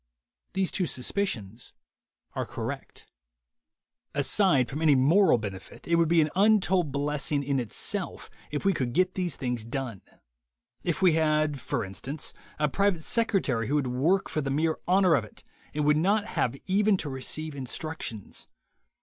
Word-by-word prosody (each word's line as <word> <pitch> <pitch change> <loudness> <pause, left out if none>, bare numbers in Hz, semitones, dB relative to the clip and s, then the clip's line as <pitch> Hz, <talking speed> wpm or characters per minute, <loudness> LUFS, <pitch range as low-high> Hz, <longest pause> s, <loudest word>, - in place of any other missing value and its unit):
These 190 -1 0
two 185 -3 -1
suspicions 125 - -2 0.6
are - - -2
correct. - - -6 1.1
Aside 145 - +3
from 150 +3 -5
any 155 -3 +5
moral 155 +5 +5
benefit, 100 -4 -8
it 170 - 0
would 170 -1 +4
be 170 -1 +5
an 150 -1 0
untold 190 -5 +3
blessing 145 0 -1
in 140 -1 0
itself 120 -5 -4 0.2
if 145 +5 -4
we 195 - +4
could 125 -7 -2
get 185 +1 +2
these 180 -2 -2
things 125 -4 -3
done 120 -4 -5 0.4
— - - -47
if 170 - -4
we 180 -3 +6
had, 155 -2 +2
for - - -2
instance, 135 +10 -4 0.2
a 150 - +2
private 190 +1 +1
secretary 150 - 0
who 145 - 0
would 145 -2 +1
work 140 +10 +1
for 155 - -2
the 135 - -3
mere 155 +3 0
honor 185 -1 +4
of 140 - +3
it 105 - -14 0.3
and 150 0 -1
would 150 0 +4
not 200 +6 +2
have 125 - 0
even 200 +1 +3
to 160 - -4
receive 145 +3 -3
instructions. 135 -5 -5
150 Hz, 160 wpm, -28 LUFS, 130-180 Hz, 1.1 s, we